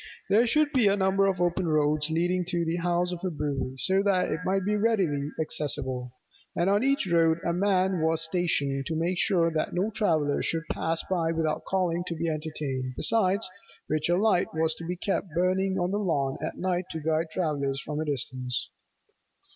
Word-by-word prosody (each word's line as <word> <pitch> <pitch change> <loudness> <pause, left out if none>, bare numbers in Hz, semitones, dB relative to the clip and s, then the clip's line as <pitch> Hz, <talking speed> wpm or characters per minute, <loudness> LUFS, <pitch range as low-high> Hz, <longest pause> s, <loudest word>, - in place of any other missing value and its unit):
There 225 +4 +5
should 300 +4 +2
be 250 -7 +3
a 200 0 +3
number 195 0 +2
of 190 -2 0
open 175 0 0
roads 150 -1 +2
leading 175 +3 +1
to 175 -1 -1
the 165 +1 -1
house 175 +1 0
of 180 - -4
a 185 - 0
brewy, 145 -4 -3
so 190 +7 +3
that 195 -2 +1
it 155 - -1
might 190 0 0
be 210 +1 +1
readily 190 -10 +1
accessible: 130 -5 -2 0.4
and 175 +3 +2
on 205 +1 +3
each 275 -3 +2
road 165 -2 +3
a 170 - +1
man 190 -1 +1
was 160 0 +1
stationed 150 -6 0
to 165 - -2
make 170 +3 -1
sure 170 -3 +3
that 155 - -1
no 195 +5 0
traveller 160 -9 +1
should 165 0 0
pass 165 0 -1
by 170 -3 0
without 160 -2 -1
calling 175 -2 0
to 170 - -3
be 165 +1 -2
entertained; 150 -5 -3
besides 200 -2 +2 0.4
which 155 +1 -1
a 175 - +3
light 200 -3 +3
was 160 0 +1
to 165 - -9
be 180 +2 -3
kept 195 +2 -2
burning 190 +2 +1
on 180 0 0
the 205 - 0
lawn 140 -9 -1
at - - -4
night 180 -1 -1
to 160 - -4
guide 160 +1 0
travellers 145 -5 -1
from 150 +1 -5
a 155 - -1
distance. 130 -3 -3
170 Hz, 195 wpm, -27 LUFS, 155-190 Hz, 0.4 s, There